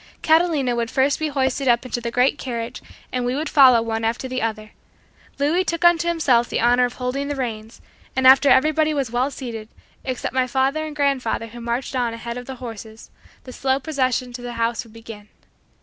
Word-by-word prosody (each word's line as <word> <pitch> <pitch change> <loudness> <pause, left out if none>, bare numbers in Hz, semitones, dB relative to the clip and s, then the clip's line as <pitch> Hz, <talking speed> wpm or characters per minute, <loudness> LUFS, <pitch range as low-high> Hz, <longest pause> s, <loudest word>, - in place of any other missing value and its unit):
Catalina 315 -6 +2
would 235 -1 -2
first 270 +2 +1
be 315 - -1
hoisted 270 -1 -1
up 240 0 +3
into 245 -1 -4
the 235 - -3
great 250 +3 +1
carriage 235 -1 -5 0.3
and 250 -1 -2
we 245 +1 -1
would 305 +3 -2
follow 255 -6 +6
one 225 0 -3
after 230 +3 -1
the 255 0 -3
other. 215 -1 -3 0.7
Louis 305 +6 +1
took 335 -1 -2
unto 340 0 +4
himself 270 -8 +2
the - - -1
honor 245 +1 +4
of 245 - -4
holding 260 +3 -3
the 290 - -3
reins, 225 -4 -5 0.3
and 260 0 0
after 270 +2 +7
everybody 310 +2 +3
was 270 -5 -2
well 250 +3 0
seated, 230 -6 -7 0.3
except 255 -2 -4
my 260 -1 +1
father 270 +5 0
and 300 - -8
grandfather 275 -6 0
who 235 +1 -11
marched 240 +3 -3
on 240 -2 -1
ahead 235 +1 -6
of 245 - -11
the 265 - -6
horses, 225 -3 -10 0.3
the 255 - -10
slow 265 +1 0
procession 255 -4 -1
to 245 - -7
the 245 0 -6
house 230 0 -1
would 225 -2 -18
begin. 225 -2 -11
255 Hz, 205 wpm, -22 LUFS, 235-275 Hz, 0.7 s, after